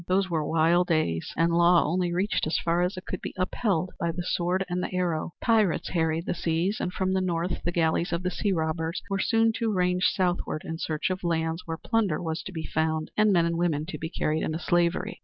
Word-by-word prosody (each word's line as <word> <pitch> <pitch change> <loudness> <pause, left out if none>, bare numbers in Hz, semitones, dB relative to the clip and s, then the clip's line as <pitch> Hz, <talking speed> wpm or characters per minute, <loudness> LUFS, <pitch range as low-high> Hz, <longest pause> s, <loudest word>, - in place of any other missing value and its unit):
Those 185 0 +1
were 160 -2 +1
wild 165 +3 +3
days, 155 - 0
and 165 +1 +3
law 170 0 +5
only 175 +2 0
reached 185 -1 0
as 155 - +1
far 170 +1 +1
as 180 +2 -1
it 185 - -7
could 185 - -5
be - - -6
upheld 185 -1 0
by 170 - 0
the 175 +2 -4
sword 180 +2 0
and 180 0 -2
the - - -3
arrow. 175 -3 -1
Pirates 220 -7 +2
harried 160 -1 0
the - - -1
seas 170 +4 -1
and 180 - -2
from 190 0 -1
the 190 - +1
north 175 -1 -1
the 175 - 0
galleys 170 0 +1
of 170 +1 -1
the 180 - -1
sea 205 - -1
robbers 160 0 -1
were 195 - 0
soon 225 +2 +3
to 225 -1 0
range 180 -1 +1
southward 180 -4 0
in 160 0 -5
search 155 +3 -1
of 185 0 -4
lands 165 0 -1
where 165 0 -3
plunder 210 -5 0
was 160 -1 -3
to - - -7
be 160 -3 -5
found 160 0 -1
and 215 -1 +4
men 170 -3 +4
and 170 0 -1
women 160 -4 0
to - - -5
be 160 - -4
carried 155 -2 -1
into 155 - -1
slavery. 175 0 0
175 Hz, 230 wpm, -27 LUFS, 160-185 Hz, -, law